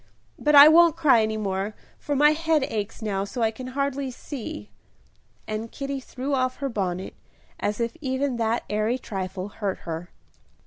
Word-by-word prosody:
But 300 0 +3
I 285 +1 +11
won't 330 0 +6
cry 280 -8 +5
any 220 0 -1
more, 200 0 -2 0.2
for 290 - -2
my 295 +2 +6
head 320 -1 +1
aches 220 -2 -4
now 195 -2 -1
so 230 +4 -3
I 220 - +2
can 255 +3 -8
hardly 280 -1 -1
see." 240 - -7 0.8
And 215 +1 -4
Kitty 275 0 -4
threw 265 +2 -5
off 255 -1 +1
her 275 -1 -3
bonnet, 190 -5 -3 0.5
as 210 +2 -2
if 235 0 -1
even 260 -2 -1
that 230 0 0
airy 215 +4 0
trifle 190 -4 -5
hurt 200 -2 -4
her. 165 +1 -5
235 Hz, 170 wpm, -25 LUFS, 205-280 Hz, 0.8 s, I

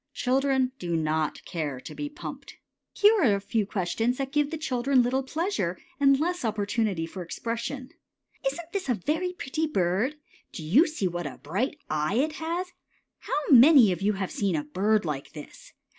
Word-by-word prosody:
Children 265 0 +1
do 170 -2 -2
not 155 -1 -1
care 150 -6 -3
to - - -9
be 295 0 -4
pumped. 295 - -9 0.4
Here 415 +2 +5
are 225 -9 +4
a - - -2
few 205 +1 -1
questions 225 +5 -1
that 270 -1 -3
give 295 0 +1
the 320 - -4
children 260 -3 +2
little 255 +2 +1
pleasure 270 - -2 0.2
and 275 -1 +5
less 350 +1 -1
opportunity 210 -4 -1
for 180 +3 -8
expression: 235 - -4 0.6
Isn't 335 +4 -9
this 385 -8 -3
a 245 - +3
very 320 - -1
pretty 315 -1 -2
bird? 195 - 0 0.4
Do 160 - -6
you 230 - +5
see 305 -11 -2
what 175 -2 -3
a 130 - -8
bright 220 - -2
eye 155 +5 -1
it 290 +6 +2
has? 345 +3 -3 0.5
How - - -1
many 260 -4 +8
of 180 - -3
you 205 +2 +2
have 190 -1 -3
seen 195 -4 0
a 150 - -1
bird 200 +7 +1
like 150 -3 -4
this? 150 -2 -11
235 Hz, 180 wpm, -27 LUFS, 180-290 Hz, 0.6 s, many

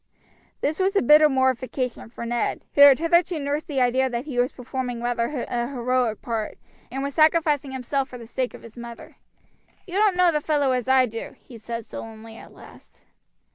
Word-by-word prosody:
This 305 +4 -1
was 385 +2 +1
a - - +4
bitter 300 +4 +7
mortification 260 -2 -1
for 235 0 -7
Ned, 240 0 -2
who 285 - +3
had 280 -2 +9
hitherto 340 +1 +2
nursed 290 +1 -3
the 275 -4 -1
idea 260 +2 +2
that 240 +1 -4
he 265 -5 -3
was 245 +1 +2
performing 250 -1 -5
rather 240 +2 -1
a 240 0 -2
heroic 250 -3 -1
part, 225 -3 -3 0.3
and 270 +2 -4
was 280 0 -3
sacrificing 310 -3 +3
himself 265 +1 -2
for 250 - -9
the 235 - -10
sake 250 +2 -3
of - - -14
his 230 +1 -12
mother. 235 -1 -10 0.7
"You 365 - -11
don't 415 -4 +3
know 360 -1 +5
the 300 -2 -1
fellow 290 -3 +1
as 250 -2 -1
I 260 -1 +5
do," 225 -1 -7
he 245 - -15
said 230 0 -6
sullenly 225 0 -9
at - - -13
last. - - -17
260 Hz, 195 wpm, -24 LUFS, 240-295 Hz, 0.7 s, had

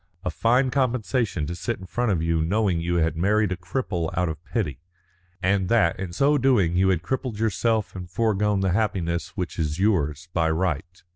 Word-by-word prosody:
A 90 - 0
fine 125 +8 +2
compensation 125 - 0
to 85 - -4
sit 115 +7 -3
in 95 - -10
front 120 +4 -1
of 85 -4 0
you 80 -1 +1
knowing 95 0 +1
you 85 +1 -1
had 80 -2 +1
married 105 +4 +2
a - - 0
cripple 90 -3 -3
out 90 -1 +1
of 80 0 -7
pity, 80 - -3 0.6
and 95 0 +1
that 90 -8 +3
in 95 -2 -4
so 140 - +2
doing 115 -10 +3
you 95 +1 +3
had 90 -3 +1
crippled 130 0 -3
yourself 110 0 0
and 90 -1 -7
foregone 105 0 +1
the 95 -1 +1
happiness 90 -5 -1
which 90 -3 -4
is 75 -1 -1
yours 85 -6 +1
by 80 -2 +2
right. 85 +1 -2
95 Hz, 195 wpm, -24 LUFS, 85-110 Hz, 0.6 s, that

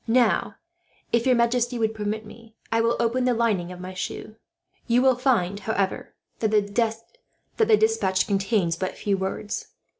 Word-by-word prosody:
"Now, 235 -1 +2 0.6
if 235 +2 +2
your 255 - +5
majesty 240 +1 +1
will 220 -1 +1
permit 215 0 -4
me, 225 +1 -14 0.2
I 225 0 +3
will 230 +1 +2
open 235 +2 +1
the 250 -1 +2
lining 205 -7 0
of 180 - -9
my 185 +1 -7
shoe. 185 +3 -6 0.5
You 240 +1 +4
will 260 0 +5
find, 225 -7 +1
however, 200 -3 -2 0.2
that 220 - +1
the 225 - 0
despatch 440 - +2
contains 195 -3 +1
but 185 -1 -3
a - - -17
few 200 -1 0
words. 190 +2 -4
225 Hz, 160 wpm, -25 LUFS, 200-240 Hz, 0.6 s, your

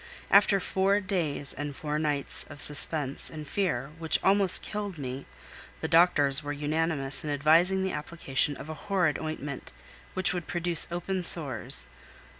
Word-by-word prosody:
After 200 0 +5
four 195 +2 +1
days 170 -8 -2
and 145 0 -6 0.3
nights 145 -2 -3
of 145 -1 -11
suspense 145 -1 +1
and 155 -2 -9
fear, 140 -7 -2
which 160 -1 +2
almost 195 -1 +4
killed 205 -4 -5
me, 135 -1 -6 0.5
the - - -3
doctors 150 -5 +4
were 145 -1 -5
unanimous 145 -1 -2
in 155 - -5
advising 165 +6 +3
the 190 - -1
application 150 -2 -2
of - - -9
a 155 - -5 0.2
horrid 180 -6 +1
ointment, 150 -3 -6 0.4
which 185 +1 +2
would 175 -2 -5
produce 175 -2 +1
open 180 +2 -3
sores. 150 - +3
160 Hz, 145 wpm, -28 LUFS, 145-180 Hz, 0.5 s, After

